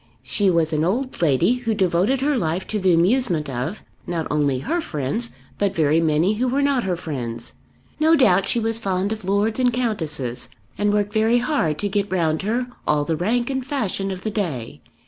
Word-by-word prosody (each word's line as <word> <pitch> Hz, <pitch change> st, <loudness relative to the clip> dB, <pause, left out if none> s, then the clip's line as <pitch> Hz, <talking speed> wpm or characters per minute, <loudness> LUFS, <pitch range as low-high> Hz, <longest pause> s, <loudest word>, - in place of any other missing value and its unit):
She 195 Hz, +9 st, +1 dB
was 165 Hz, -2 st, +2 dB
an 155 Hz, 0 st, +1 dB
old 245 Hz, +9 st, -1 dB
lady 165 Hz, -, +3 dB
who 230 Hz, -3 st, -2 dB
devoted 190 Hz, +7 st, +1 dB
her 290 Hz, +1 st, +2 dB
life 175 Hz, -4 st, -1 dB
to 215 Hz, -, -1 dB
the 185 Hz, -1 st, +3 dB
amusement 175 Hz, -, +2 dB
of 130 Hz, -, -4 dB, 0.2 s
not 170 Hz, -2 st, -2 dB
only 145 Hz, -3 st, +1 dB
her 330 Hz, -, -1 dB
friends, 155 Hz, -, -2 dB, 0.2 s
but 200 Hz, -1 st, 0 dB
very 155 Hz, 0 st, +3 dB
many 160 Hz, +5 st, +2 dB
who 245 Hz, +4 st, 0 dB
were 275 Hz, +3 st, +1 dB
not 275 Hz, -5 st, +1 dB
her 185 Hz, -2 st, 0 dB
friends. 130 Hz, -9 st, -5 dB, 0.5 s
No 320 Hz, +1 st, +5 dB
doubt 195 Hz, -, +4 dB
she 235 Hz, -, +3 dB
was 225 Hz, 0 st, 0 dB
fond 195 Hz, -1 st, -1 dB
of 220 Hz, -1 st, -4 dB
Lords 205 Hz, +4 st, +1 dB
and 250 Hz, -1 st, +3 dB
Countesses, 160 Hz, -, -1 dB, 0.3 s
and 205 Hz, 0 st, +1 dB
worked 205 Hz, 0 st, 0 dB
very 220 Hz, +2 st, +3 dB
hard 245 Hz, -, 0 dB
to 205 Hz, -, -1 dB
get 205 Hz, 0 st, -1 dB
round 160 Hz, -4 st, +1 dB
her 235 Hz, +5 st, -1 dB, 0.2 s
all 150 Hz, -1 st, +2 dB
the 160 Hz, -, 0 dB
rank 235 Hz, -, 0 dB
and 265 Hz, -1 st, -2 dB
fashion 220 Hz, -8 st, -2 dB
of 190 Hz, -1 st, -5 dB
the 215 Hz, -, -2 dB
day. 135 Hz, -, -3 dB
195 Hz, 200 wpm, -22 LUFS, 160-235 Hz, 0.5 s, No